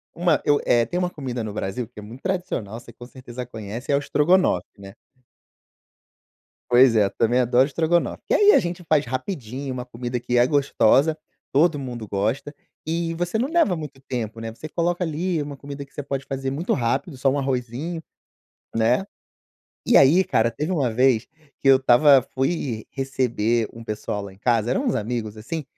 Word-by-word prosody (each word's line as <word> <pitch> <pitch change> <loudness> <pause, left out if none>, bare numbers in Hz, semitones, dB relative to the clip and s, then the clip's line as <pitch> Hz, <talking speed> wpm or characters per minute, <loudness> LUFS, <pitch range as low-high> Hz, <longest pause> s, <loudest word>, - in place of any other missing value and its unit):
uma 170 -3 +2
eu 145 0 +3
é 120 -1 +3
tem 175 - -4
uma 180 -1 0
comida 125 -6 -5
no 105 -2 -5
Brasil 105 +4 -3
que 120 -2 -13
é - - -8
muito 115 +5 -11
tradicional 180 - -3
você 120 - -14
com 120 +1 -12
certeza 125 -1 -8
conhece 110 +2 -6
é - - +4
o - - +3
estrogonofe, 150 - +2
né. 100 -1 -11 1.8
Pois 125 0 +6
é, 105 - +5
eu 100 - 0
também 120 +2 +1
adoro 125 +1 +4
estrogonofe, 165 +4 0
que - - +1
aí 415 0 +6
a - - +6
gente 175 0 -3
faz 155 -2 +3
rapidinho, 130 - -4
uma 125 -1 -5
comida 125 0 -4
que 120 0 0
é 120 - +5
gostosa, 140 +1 +3 0.4
todo 150 +2 +3
mundo 120 -4 -6
gosta 115 +9 -1 0.3
e 165 +1 -1
você 175 +5 -2
não 250 +4 0
leva 320 - +2
muito 150 -4 -8
tempo, 115 -3 -4
né. 115 0 -5
Você 155 +7 -9
coloca 175 +2 -1
ali 165 +1 -1
uma 145 -1 -7
comida 140 +1 -8
que 140 - -24
você 145 - -5
pode 140 0 -4
fazer 135 -1 -3
muito 150 +6 -2
rápido, 130 +6 -1
só 135 +1 +2
um 140 - 0
arrozinho 135 +5 -3 0.7
né. 115 +9 +2 0.8
E 240 - +3
aí 155 +8 +6
cara, 115 -8 +1
teve 150 +8 -3
uma 140 -9 +1
vez, 125 -1 +3 0.3
que - - -1
eu 135 - +8
estava 135 +2 +6
fui 130 -5 -1
receber 120 -4 0
um 115 - -10
pessoal 105 -1 -4
lá 100 -1 -9
em - - -20
casa, 115 +1 +1
eram 265 - 0
uns 245 - +1
amigos, 110 -1 -3
assim, 150 +9 -5
130 Hz, 190 wpm, -23 LUFS, 115-155 Hz, 1.8 s, eu